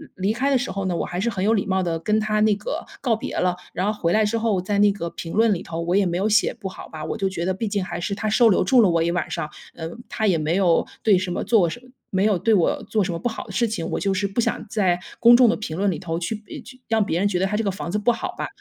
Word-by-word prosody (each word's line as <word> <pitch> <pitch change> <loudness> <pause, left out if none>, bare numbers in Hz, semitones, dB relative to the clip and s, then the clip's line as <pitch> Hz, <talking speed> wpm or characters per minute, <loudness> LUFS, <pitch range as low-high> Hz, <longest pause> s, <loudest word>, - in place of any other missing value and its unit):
离 195 +3 0
开 260 +5 0
的 270 - +4
时 250 +1 -3
候 195 -1 -3
呢， 180 -2 -1
我 - - -1
还 175 0 -4
是 225 +5 0
很 195 -3 -2
有 220 - +4
礼 205 - 0
貌 190 -1 +1
地 165 -2 -1
跟 215 +5 +1
他 215 0 0
那 215 -1 +4
个 210 - -4 0.2
告 240 -4 +2
别 220 - -6
了。 180 -1 +1 0.2
然 190 +4 0
后 215 - -9
回 170 - +2
来 215 0 +3
之 220 +2 0
后 220 -5 0
在 200 +2 -1
那 205 0 +5
个 170 -4 -4
评 165 - -7
论 225 0 +4
里 180 - -4
头， 165 0 -5
我 175 +2 0
也 200 0 +3
没 175 -1 -1
有 200 +4 +1
写 220 +1 +3
不 200 - -7
好 - - -10
吧。 155 -1 -7
我 - - -3
就 195 - 0
觉 170 -3 -4
得 190 - +1
毕 215 +4 -3
竟 200 -2 -1
还 175 -2 -5
是 200 +3 -2
他 215 +1 -2
收 230 +2 +5
留 195 - +3
住 240 +6 +5
了 205 - +4
我 165 -1 +2
一 170 - 0
晚 175 - -2
上， 150 - -3 0.3
呃， 160 -1 -5 0.2
他 220 - -2
也 180 -4 +3
没 155 +2 0
有 180 -4 +3 0.2
对 210 -4 +5
什 185 0 -2
么 - - -2
做 205 -8 +3
什 160 - -7
么 255 - -19 0.2
没 190 +1 +1
有 210 -3 +3
对 225 - +2
我 180 - +1
做 215 -2 0
什 185 - -2
么 165 - -4
不 240 - -1
好 225 - -6
的 210 - -10
事 230 +5 +1
情。 200 -7 -3
我 - - -1
就 195 -1 0
是 200 +2 0
不 200 +5 -1
想 225 - -2
在 185 -5 +1 0.2
公 235 +1 +8
众 250 -1 +6
的 225 - +2
评 165 -7 -5
论 200 +2 +1
里 160 - -4
头 165 -2 -3
去， 175 +6 -3 0.2
呃， - - -7
去 255 +1 -14
让 220 -2 +2
别 170 -3 -1
人 200 - +2
觉 195 -3 0
得 190 - +2
他 210 - -2
这 225 - 0
个 200 - 0
房 185 -2 -6
子 210 - 0
不 215 +4 +3
好 235 - -4
吧。 - - -3
200 Hz, 360 characters per minute, -23 LUFS, 180-220 Hz, 0.3 s, 公